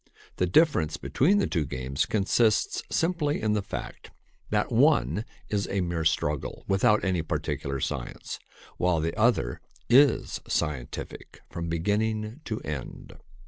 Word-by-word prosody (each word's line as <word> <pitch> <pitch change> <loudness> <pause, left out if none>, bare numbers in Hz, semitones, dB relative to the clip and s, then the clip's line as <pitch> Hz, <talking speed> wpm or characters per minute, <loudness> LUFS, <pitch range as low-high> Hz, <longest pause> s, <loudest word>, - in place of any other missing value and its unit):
The 90 - +1
difference 90 - +3
between 185 +10 +2
the 200 - +2
two 80 -4 0
games 65 0 -2
consists 110 +1 +2
simply 165 -3 0
in 110 -1 +1
the 105 - +1
fact - - -7 0.4
that - - 0
one 80 - +3 0.2
is 100 -1 -1
a 100 -1 0
mere 85 -2 -2
struggle 75 -2 -1
without 100 +2 +3
any 90 -3 +1
particular 70 -3 -3
science, - - -4 0.4
while 90 -2 +2
the 80 +1 -2
other 110 - +1 0.3
is 140 +3 +4
scientific 70 -6 -4
from 85 -1 -4
beginning 110 - -1
to 110 -2 -3
end. 75 -4 -6
95 Hz, 135 wpm, -27 LUFS, 80-110 Hz, 0.4 s, is